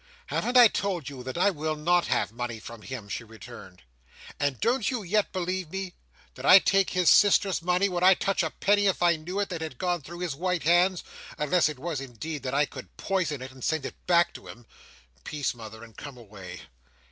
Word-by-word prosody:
"Haven't 245 +1 0
I 245 -1 +10
told 185 -9 -3
you, 135 -3 -9
that 130 +5 -6
I 195 +3 +3
will 155 -2 -3
not 175 +3 +1
have - - 0
money 120 -1 -5
from 115 0 -10
him?" 125 -3 -7
she 100 - -5
returned. 110 - -13 0.6
"And 145 -3 -1
don't 230 0 +1
you 245 -5 -3
yet 205 +3 0
believe 185 -2 -3
me? 190 0 -5 0.4
Did - - -11
I 185 - +9
take 195 0 +3
his 180 -2 0
sister's 195 -2 +5
money? 180 +3 +2
Would 180 -2 -3
I 185 +1 +7
touch 195 +1 0
a 160 - -1
penny, 205 +4 +2
if 190 -2 0
I 170 -1 +4
knew 175 +5 -5
it, 205 - -1
that 170 -3 -5
had 155 -6 -6
gone 175 +1 -1
through 170 +5 -10
his 175 -5 -2
white 180 +3 -2
hands—unless 175 -2 +1
it 150 - -7
was, 155 0 -4
indeed, 135 +4 -6
that 130 0 -3
I 145 +1 +3
could 130 -3 -12
poison 170 -9 -2
it, 130 - -8
and 130 -1 -13
send 160 -3 -1
it - - -9
back 175 -1 +3
to - - -12
him? 120 0 -12 0.6
Peace, 145 -3 -2
mother, 110 -1 -11
and 115 -1 -14
come 140 -3 -9
away." 100 -6 -11
165 Hz, 215 wpm, -27 LUFS, 130-185 Hz, 0.6 s, I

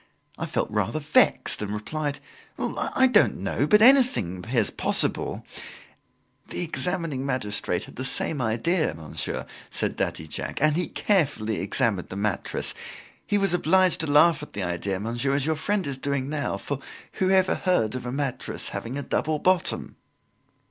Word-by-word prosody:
I - - -4
felt - - -2
rather 105 +7 -1
vexed 150 -6 +3
and 105 0 -3
replied: 145 +7 -3 0.4
"I 260 - 0
don't 245 -5 +4
know, 110 +9 -1
but 210 +6 +5
anything 235 - +5
appears 90 - 0
possible" - - 0 1.0
"The - - -4
examining 165 -5 -2
magistrate 125 -6 -1
had - - -12
the 130 - -3
same 135 +2 +1
idea, 120 - 0
monsieur," 80 -2 -5 0.2
said - - -1
Daddy 80 - -2
Jacques, - - -5
"and 155 +1 +3
he 180 +1 0
carefully 135 - 0
examined 100 -2 0
the - - -7
mattress. 100 0 -1 0.5
He 205 - +2
was 195 -3 +1
obliged 185 +1 +3
to 160 - 0
laugh 150 +2 +5
at 150 - -10
the 100 - -3
idea, 90 +2 -2
monsieur, 120 +6 -1
as 140 -1 +1
your 160 0 +1
friend 200 +4 -1
is 135 -2 -3
doing 140 -1 -2
now, 150 -1 -2
for 140 -2 -4 0.4
whoever 190 0 +3
heard 180 - +1
of 125 -1 -5
a - - -3
mattress 140 -1 -2
having 125 +4 -5
a 140 - -4
double 155 +2 -1
bottom?" 185 +3 0
140 Hz, 160 wpm, -25 LUFS, 110-170 Hz, 1.0 s, but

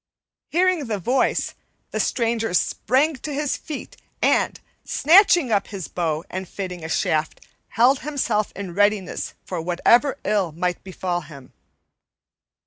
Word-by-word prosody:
Hearing 360 -3 +2
the 215 -2 -1
voice, 250 +8 0 0.4
the - - -2
stranger 225 -4 0
sprang 270 - +1
to 295 - -6
his 290 0 -1
feet 305 - -8 0.2
and; - - +2 0.2
snatching 340 - +5
up 200 -2 +1
his 195 -5 -6
bow 160 -3 -2
and 185 -1 -6
fitting 180 -4 -6
a 160 - -5
shaft, 155 -1 0 0.3
held 250 +5 +3
himself 255 -8 -1
in 190 -3 -6
readiness 205 -1 0
for 180 -3 -4
whatever 235 - +3
ill 200 -6 +1
might 180 +2 -2
befall 180 -1 -3
him. 140 -5 -13
205 Hz, 135 wpm, -23 LUFS, 180-265 Hz, 0.4 s, snatching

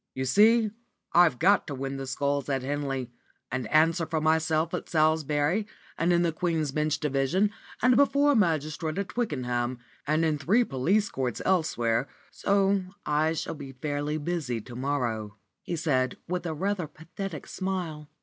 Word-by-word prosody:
"You 130 0 -2
see, 215 - +5 0.4
I've 170 -7 +5
got 195 +7 +3
to 145 - -4
win 135 +1 -4
the 135 0 -5
Sculls 140 +1 -1
at 135 -2 0
Henley, 135 -3 -3 0.4
and 130 -2 -2
answer 165 - +3
for 160 0 -1
myself 160 +1 +1
at - - -4
Salisbury 155 +4 +2 0.3
and 170 +2 +1
in 175 0 +3
the 170 - +2
Queen's 160 -3 -1
Bench 150 +1 0
Division, 150 +8 +1 0.3
and 250 0 +5
before 285 +1 +4
a - - +2
magistrate 160 - 0
at 200 -1 -2
Twickenham, 125 - -2 0.3
and 155 +2 +2
in 155 -2 0
three 210 +12 +3
police 195 - +1
courts 125 -3 -2
elsewhere, 135 -9 +1 0.2
so 200 0 +2 0.2
I 155 +2 +2
shall 160 - -3
be 140 -3 -9
fairly 145 +3 -2
busy 145 -6 -2
to 120 +3 -11
morrow," 120 -6 -2 0.2
he 175 - -4
said, 130 -6 0
with 180 0 -2
a 160 - -2
rather 190 0 -1
pathetic 165 +2 -7
smile. 175 -6 -4
155 Hz, 160 wpm, -27 LUFS, 135-175 Hz, 0.4 s, see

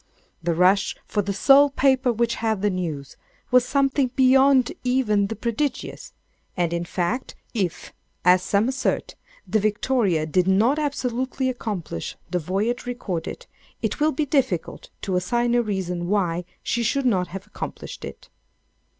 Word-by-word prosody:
The 170 0 0
rush 185 +3 +3
for 210 - 0
the 200 0 -3
"sole 275 +8 +6
paper 265 -2 +2
which 235 0 0
had 220 -3 0
the 205 - +3
news," 155 -7 -4 0.3
was 250 -1 +6
something 275 -1 +1
beyond 265 -1 +5
even 235 -6 +2
the 225 - -4
prodigious; 245 +4 -3 0.5
and, 170 -1 0
in 170 0 -2
fact, 185 +9 -2 0.2
if 190 -8 -3 0.3
(as 180 0 +6
some 200 +4 +1
assert) 260 0 -1 0.3
the 215 +4 +2
"Victoria" 205 -5 +1
did 180 +3 +1
not 225 +10 +3
absolutely 260 -2 -1
accomplish 205 - -4 0.2
the 180 - +1
voyage 205 +9 -2
recorded, 195 -9 -4 0.4
it - - -1
will 305 +1 +3
be 300 +2 -1
difficult 260 - -1
to 190 - -1
assign 240 +6 0
a 240 - +4
reason 180 -5 -3
why 180 -4 0 0.2
she 235 - -1
should 265 +4 0
not 185 -7 +2
have 195 +3 -8
accomplished 210 - -7
it. - - -9
215 Hz, 150 wpm, -23 LUFS, 185-255 Hz, 0.5 s, sole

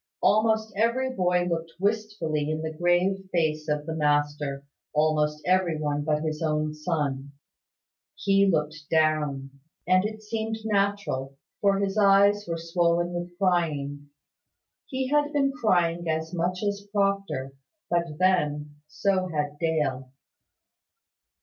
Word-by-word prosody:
Almost 220 0 +3
every 235 +5 +1
boy 180 -4 +2
looked 165 -1 -3
wistfully 200 -8 -1
in 155 0 -2
the 160 0 -3
grave 180 +3 +1
face 155 -2 0
of 150 0 -1
the 160 - -3
master; 145 -2 0 0.3
almost 150 0 +1
every 180 -3 +2
one 145 -1 -1
but 150 0 0
his 155 0 -3
own 155 -1 0
son. 145 -3 -2 0.8
He 195 0 +3
looked 155 -1 -2
down; 150 -4 +1 0.4
and 185 0 +4
it 215 +1 -5
seemed 220 +1 -3
natural: 200 -10 -1 0.2
for 200 -1 +3
his 200 +1 0
eyes 200 0 +5
were 165 -1 -2
swollen 170 +1 +1
with 175 0 -5
crying. 150 -6 0 0.8
He 260 -1 -2
had 295 0 +2
been 275 -2 +2
crying 175 - +1
as 160 +1 -2
much 180 +3 -1
as 200 0 -2
Proctor: 195 -10 -1 0.3
but, 170 -3 -1
then, 150 -5 +1
so 185 +3 0
had 150 -3 -3
Dale. 145 -6 -1
170 Hz, 130 wpm, -26 LUFS, 150-200 Hz, 0.8 s, eyes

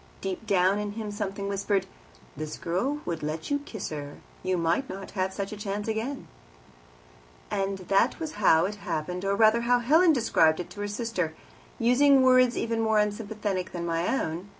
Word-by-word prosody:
Deep 195 +3 -5
down 195 0 +3
in 205 0 -3
him 215 -1 -5
something 200 -1 -4
whispered, 200 0 0 0.5
"This 155 +1 -5
girl 255 - -1
would 170 -2 -3
let 155 - -4
you 285 - +2
kiss 220 -8 -6
her; 145 -2 -6 0.2
you 185 -1 0
might 170 +10 0
not 195 +1 -7
have 190 -1 -1
such 200 +1 -4
a - - -5
chance 205 0 -4
again." 225 +5 -3 1.2
That 195 +3 +1
was 320 -2 -4
"how 160 -3 +5
it 205 +2 -4
happened," 180 -2 -4
or, 195 0 +1
rather, 220 +2 +4
how 245 +1 +3
Helen 315 +9 +5
described 180 - +3
it 180 - -6
to - - -10
her 205 - -2
sister, 205 -6 -2 0.4
using 265 +3 +5
words 255 -1 +5
even 230 0 -1
more 220 -1 +2
unsympathetic 210 -3 -2
than 170 -1 -4
my 170 +1 -1
own. 170 +5 -4
200 Hz, 175 wpm, -27 LUFS, 180-230 Hz, 1.2 s, how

